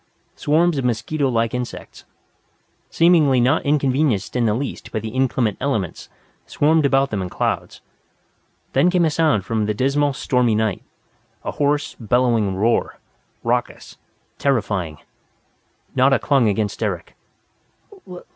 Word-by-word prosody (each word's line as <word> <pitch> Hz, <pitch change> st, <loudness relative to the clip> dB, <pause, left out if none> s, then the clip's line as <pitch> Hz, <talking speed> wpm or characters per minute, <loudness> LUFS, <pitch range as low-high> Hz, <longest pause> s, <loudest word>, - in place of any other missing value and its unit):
Swarms 160 Hz, +1 st, +1 dB
of -, -, -3 dB
mosquito 125 Hz, +5 st, -1 dB
like 115 Hz, -2 st, 0 dB
insects, 125 Hz, -1 st, -6 dB, 0.8 s
seemingly 160 Hz, -6 st, +4 dB
not 125 Hz, +3 st, +2 dB
inconvenienced 140 Hz, -7 st, 0 dB
in 120 Hz, -2 st, +2 dB
the 105 Hz, -, +1 dB
least 135 Hz, +4 st, -5 dB
by -, -, -3 dB
the 110 Hz, +1 st, -5 dB
inclement 120 Hz, -3 st, 0 dB
elements, 110 Hz, -, -3 dB, 0.4 s
swarmed 155 Hz, 0 st, +2 dB
about 135 Hz, 0 st, +2 dB
them 105 Hz, -3 st, -2 dB
in 90 Hz, -, -4 dB
clouds. -, -, -3 dB, 0.9 s
Then 175 Hz, -, +4 dB
came 180 Hz, -2 st, +2 dB
a 160 Hz, -, +1 dB
sound 150 Hz, -, +1 dB
from 110 Hz, 0 st, -1 dB
the 105 Hz, -, -1 dB
dismal 140 Hz, +4 st, +1 dB
stormy 125 Hz, -4 st, +1 dB
night, 110 Hz, -3 st, -1 dB, 0.6 s
a -, -, -3 dB
hoarse, 145 Hz, 0 st, 0 dB
bellowing 115 Hz, -4 st, +1 dB
roar, 110 Hz, +5 st, 0 dB, 0.5 s
raucous, -, -, -3 dB, 0.4 s
terrifying. 100 Hz, -, -1 dB, 1.0 s
Nada 135 Hz, +1 st, +4 dB
clung 135 Hz, -6 st, +2 dB
against 105 Hz, 0 st, -2 dB
Eric. -, -, -3 dB
125 Hz, 130 wpm, -21 LUFS, 110-145 Hz, 1.0 s, seemingly